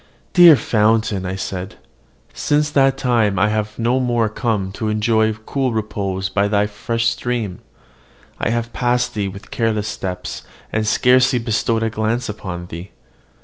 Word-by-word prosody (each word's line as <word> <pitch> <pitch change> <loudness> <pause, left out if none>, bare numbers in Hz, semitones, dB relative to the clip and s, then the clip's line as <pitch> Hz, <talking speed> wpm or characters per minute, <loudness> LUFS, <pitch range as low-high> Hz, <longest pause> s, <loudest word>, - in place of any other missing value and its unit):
"Dear 175 -3 +9
fountain!" 110 -5 +1
I 95 - -3
said, 95 0 -5 0.6
"since 150 0 0
that 135 -1 +3
time 115 -7 +1
I 100 +3 +3
have 105 0 -2
no 120 +3 +1
more 120 -3 +1
come 105 -3 -2
to 110 +3 -4
enjoy 110 +1 +2
cool 125 +4 -2
repose 100 -3 -2
by 100 +1 +1
thy 100 0 +2
fresh 115 +3 -2
stream: 115 -5 -3 0.8
I - - 0
have 115 0 -2
passed 125 0 0
thee 105 -3 -2
with 100 +1 -10
careless 110 -2 0
steps, 90 -3 -5 0.3
and 110 0 0
scarcely 125 +3 +4
bestowed 115 0 0
a 115 - -1
glance 110 +3 -1
upon 90 -5 -6
thee." 85 +2 -8
110 Hz, 150 wpm, -19 LUFS, 100-120 Hz, 0.8 s, Dear